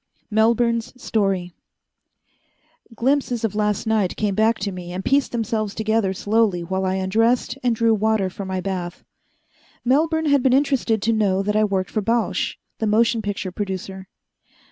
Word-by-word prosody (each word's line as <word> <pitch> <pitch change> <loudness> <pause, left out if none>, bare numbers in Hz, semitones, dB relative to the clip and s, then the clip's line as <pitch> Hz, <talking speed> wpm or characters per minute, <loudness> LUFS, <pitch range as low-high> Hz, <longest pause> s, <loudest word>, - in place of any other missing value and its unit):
Melbourne's 230 +2 +1
Story 195 -6 -1 1.4
Glimpses 250 -1 0
of 225 - 0
last 210 0 0
night 215 -4 0
came 210 -2 0
back 220 +3 +2
to 200 +1 -3
me 180 -1 -7
and 185 +2 -5
pieced 280 0 +2
themselves 220 -3 -2
together 220 -2 +1
slowly 205 -2 +1
while 190 +2 -2
I 185 0 0
undressed 225 +7 +1
and 245 -2 +1
drew 230 +1 +2
the - - +5
water 220 -2 +1
for 185 +2 -7
my 190 -1 -3
bath. 180 -2 -4 0.8
Melbourne 320 +5 +2
had 285 -2 +3
been 255 0 +3
interested 260 -6 +1
to 230 - +2
know 195 -3 +1
that 210 +1 -1
I 215 - +4
worked 190 -5 -1
for 215 - 0
Bausch, 230 +2 0 0.2
the 220 - 0
motion 225 +2 +2
picture 200 -2 -4
producer. 190 -1 -5
215 Hz, 165 wpm, -22 LUFS, 190-230 Hz, 1.4 s, the